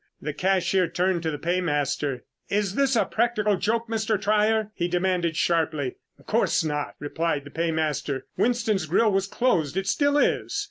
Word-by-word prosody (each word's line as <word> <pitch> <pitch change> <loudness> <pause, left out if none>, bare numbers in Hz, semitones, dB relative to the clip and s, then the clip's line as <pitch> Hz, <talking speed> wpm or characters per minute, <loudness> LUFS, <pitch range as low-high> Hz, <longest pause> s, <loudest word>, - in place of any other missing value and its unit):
The 150 +1 -4
cashier 185 +2 +1
turned 175 +1 0
to 160 - -1
the 150 - -3
paymaster. 145 -6 -1 0.3
"Is 200 -2 0
this 270 +1 +2
a 225 - +3
practical 215 -4 +1
joke, 225 +5 -1
Mr. 220 -2 0
Trier?" 215 +1 +2
he 175 -3 -1
demanded 175 -2 0
sharply. 155 -5 0 0.2
"Of - - -22
course - - +1
not," 150 -2 -3
replied 150 0 -2
the 145 - -12
paymaster. 155 -4 -1
"Winston's 225 -7 +1
grill 210 +7 +3
was 195 0 +1
closed. 185 - 0
It 190 - 0
still 285 +7 +2
is. 405 +7 +1
180 Hz, 165 wpm, -25 LUFS, 160-215 Hz, 0.3 s, a